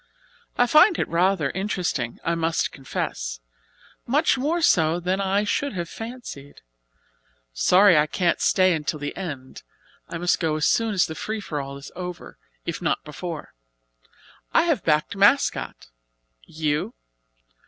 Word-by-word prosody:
I 245 - +5
find 330 - +6
it - - -1
rather 170 -4 +1
interesting, 180 - -2
I 170 - 0
must 165 0 0
confess, - - -4 0.7
much 285 +6 +3
more 300 +6 0
so 165 - +3
than 185 +3 -1
I 195 +1 +1
should 280 +6 -1
have 175 -3 -4
fancied. 225 - -9 0.9
Sorry 180 - +5
I 150 0 +4
can't 170 +2 0
stay 185 -1 +4
until 155 -1 -2
the 145 0 -5
end. 145 -9 -7 0.5
I - - -4
must 175 +1 +1
go 160 -2 0
as 155 0 0
soon 225 -2 +2
as 185 - +4
the 160 - -6
free 220 +6 -4
for 150 -8 -4
all 140 0 -7
is 140 - -11
over, 180 -1 -7 0.3
if 170 0 -4
not 165 - 0
before. 155 +2 -7 1.0
I - - +6
have 320 - 0
backed 150 +3 +1
'Mascot'; 200 - +2 0.6
you?" 150 -1 -2
175 Hz, 145 wpm, -24 LUFS, 150-200 Hz, 1.0 s, find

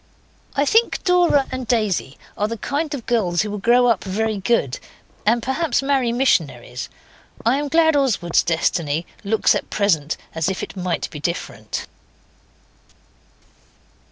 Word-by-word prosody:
I 280 - +2
think 450 +9 +2
Dora 350 -6 +4
and 260 -2 -4
Daisy 210 - 0 0.2
are 210 - 0
the 230 +1 -4
kind 290 +5 -2
of 245 - -8
girls 200 -6 +1
who 210 - -4
will 210 - -4
grow 240 +4 +4
up 230 -4 +2
very 215 +2 -1
good, 185 - 0 0.5
and 230 +1 +3
perhaps 275 +2 0
marry 270 -4 +1
missionaries. 140 - 0 0.6
I 250 +5 +3
am 295 - -2
glad 320 +1 +4
Oswald's 230 - +2
destiny 165 -1 0 0.2
looks 215 +2 +3
at - - -3
present 160 -8 +1 0.2
as 160 +2 0
if 190 - -3
it - - -7
might 180 -2 -2
be 150 - -7
different. 170 +4 -4
220 Hz, 145 wpm, -21 LUFS, 175-270 Hz, 0.6 s, Dora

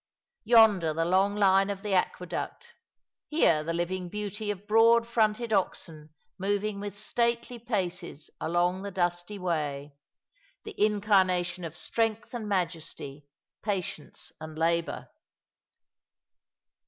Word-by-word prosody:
Yonder 210 -8 +5
the 165 +1 +1
long 190 +3 +3
line 195 -1 +4
of 200 0 -4
the 205 -2 -2
aqueduct; 190 - -2 0.6
here 170 - +3
the 165 - -2
living 175 +2 -2
beauty 210 +1 -4
of 205 -1 -4
broad 230 +2 +5
fronted 220 0 +1
oxen 160 -5 -2 0.3
moving 205 +1 -1
with 205 0 -6
stately 235 +2 -1
paces 180 - -3
along 175 +3 +1
the 200 - -4
dusty 175 +1 -2
way, 150 -6 -2 0.7
the 430 - -8
incarnation 185 -4 +2
of 165 0 -6
strength 225 +2 -1
and 220 -3 -4
majesty, 165 -6 -3 0.3
patience 190 -7 -4
and 155 0 -8
labour. 165 +1 0
195 Hz, 115 wpm, -28 LUFS, 170-210 Hz, 0.7 s, Yonder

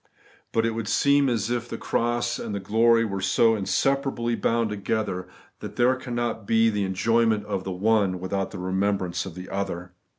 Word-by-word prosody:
But 115 0 +1
it 115 - +1
would 115 -1 -4
seem 140 +5 +3
as 115 -2 -1
if 120 0 -2
the - - -4
cross 120 0 -1
and 110 -3 -4
the - - -2
glory 115 +4 +3
were 100 -3 -3
so 115 +4 +3
inseparably 130 +3 0
bound 115 -1 0
together, 100 -2 -2 0.3
that - - -8
there 125 +2 +3
cannot 120 -4 -3
be 115 0 +4
the 105 -1 -1
enjoy 115 +5 +2
ment 105 -2 0
of 100 -3 -3
the 95 - -3
one 100 -1 +1
without 95 +1 -2
the - - -8
remembrance 95 0 -1
of 85 - -9
the 90 0 -8
other. 90 -2 -4
110 Hz, 190 wpm, -25 LUFS, 95-115 Hz, 0.3 s, be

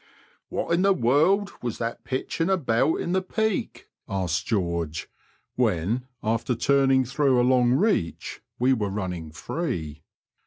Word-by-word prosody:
What - - -2
in 170 - +3
the 195 0 +4
world 175 - +3
was 120 -3 -3
that 115 0 -4
pitching 155 +6 -2
about 155 -6 +2
in 170 - -3
the 190 +1 +2
'peak? 220 +2 -2
" - - -68
asked 90 -4 -1
George, 85 -7 -1 0.5
when, 110 +10 0 0.2
after 115 +3 0
turning 135 +1 +3
through 135 0 +2
a 120 - +3
long 125 -1 +4
reach, 185 - 0 0.2
we 130 +2 +3
were 105 -5 -1
running 90 -5 -4
free. 80 - -4
125 Hz, 145 wpm, -25 LUFS, 95-160 Hz, 0.5 s, the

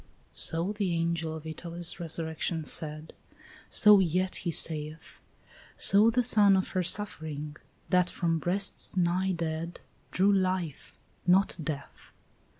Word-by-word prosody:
So 170 +5 0
the 200 -5 -2
angel 165 -1 -2
of 160 0 -10
Italy's 170 +2 -3
resurrection 160 0 -4
said, 155 +1 -1 0.6
So 210 -1 +6
yet 185 +1 0
he 175 - -4
saith; 155 -1 -3 0.6
So 210 +3 +7
the 245 +2 +1
son 205 -4 +5
of 190 - -2
her 185 - -1
suffering, 160 -6 -2 0.3
that 180 0 +2
from 165 -2 -2
breasts 190 +2 -1
nigh 180 +2 0
dead 165 0 -5 0.3
Drew 195 +2 +2
life, 185 -5 -3 0.3
not 190 +2 +3
death. 145 -2 -8
170 Hz, 125 wpm, -28 LUFS, 160-190 Hz, 0.6 s, So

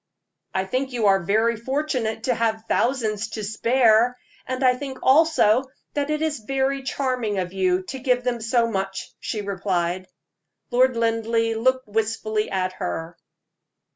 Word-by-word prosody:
"I 190 0 +1
think 255 +6 -2
you 235 -3 0
are 195 -1 +5
very 220 +6 +2
fortunate 250 -2 -2
to 250 - +2
have 225 -1 -1
thousands 230 -4 0
to 215 - -4
spare; 230 +2 +3 0.3
and 260 +1 -2
I 255 -1 +6
think 265 0 -6
also 265 -5 +4 0.3
that 290 0 -1
it 305 +1 0
is 310 -4 -1
very 270 +4 -1
charming 255 -5 -1
of 180 -1 -2
you 185 -1 +1
to 265 +8 -6
give 250 -1 +1
them 245 -2 -1
so 230 +1 +2
much," 195 -3 -4
she 215 - -3
replied. 185 -2 -2 0.6
Lord 255 0 +3
Linleigh 230 0 +1
looked 260 +2 +1
wistfully 215 0 -1
at 185 -1 -1
her. 170 -2 -4
230 Hz, 150 wpm, -23 LUFS, 205-260 Hz, 0.6 s, I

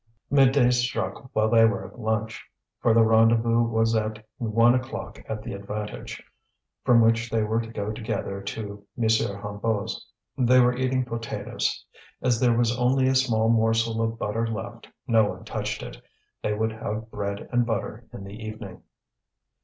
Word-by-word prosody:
Midday 135 -2 +5
struck 120 -2 -1
while 110 0 +3
they 115 0 +5
were 110 -3 +2
at - - -12
lunch, 110 -1 -2 0.4
for 115 - +3
the 115 0 +6
rendezvous 115 +1 +4
was 115 -1 +1
at 110 0 -2
one 115 0 +4
o'clock 130 +1 -4
at 110 -1 -4
the - - -5
Avantage, 105 +1 -6 0.6
from 120 -1 +5
which 115 +1 +3
they 110 -1 +1
were 110 +2 0
to 115 - -8
go 105 -2 -3
together 110 -3 -4
to 100 0 -6
M. 120 - -1
Hennebeau's. 105 -1 -1 0.3
They 125 0 +5
were 125 0 +4
eating 130 0 0
potatoes. 115 -1 -3 0.3
As 125 -3 +1
there 120 -2 +3
was 120 0 +2
only 130 +2 +3
a - - +2
small 120 -4 +2
morsel 115 0 +2
of 115 0 -1
butter 115 +2 -1
left, 115 +1 -6 0.2
no 115 -4 +4
one - - -6
touched - - -3
it. - - -9 0.4
They 105 - -1
would 110 +1 0
have 110 0 -5
bread 100 -1 -4
and 120 0 +3
butter 115 -3 -3
in 100 - -9
the 100 +3 -9
evening. 110 -3 -8
115 Hz, 165 wpm, -25 LUFS, 110-120 Hz, 0.6 s, the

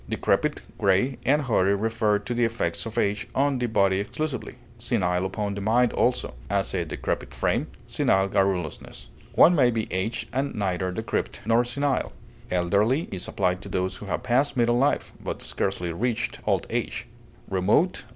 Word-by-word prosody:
Decrepit, - - 0 0.2
gray, 100 +7 +2
and 145 +2 +4
hoary 100 -6 +2
refer 110 0 +1
to 105 +4 -4
the 120 0 +1
effects 85 -7 -1
of 110 - -8
age 100 +1 0
on 140 -1 +2
the 120 - 0
body 100 -4 +2
exclusively; 135 +8 -4 0.2
senile 95 -6 0
upon 100 +1 -3
the 100 - -5
mind 115 +4 +3
also; - - +1 0.2
as, 100 0 0
a 90 -2 0
decrepit 80 - -4
frame, - - 0 0.2
senile 95 0 +2
garrulousness. 95 -5 -1 0.3
One 175 - +7
may 135 -7 +4
be 115 -2 -1
aged 95 +5 -2
and 135 +2 -1
neither 95 -3 -1
decrepit 90 - -3
nor 115 +2 +4
senile. 135 +3 -1 0.4
Elderly 100 - +1
is 95 -2 -4
applied 90 -1 0
to - - -9
those 95 0 -1
who 105 - -9
have 100 - -2
passed 130 +3 +1
middle 120 0 +3
life, 140 +2 +1
but - - -4
scarcely 90 -3 -2
reached 115 +7 -2
old - - +2
age. - - -2 0.4
Remote 95 - +2
(L. - - -20
105 Hz, 170 wpm, -25 LUFS, 95-120 Hz, 0.4 s, One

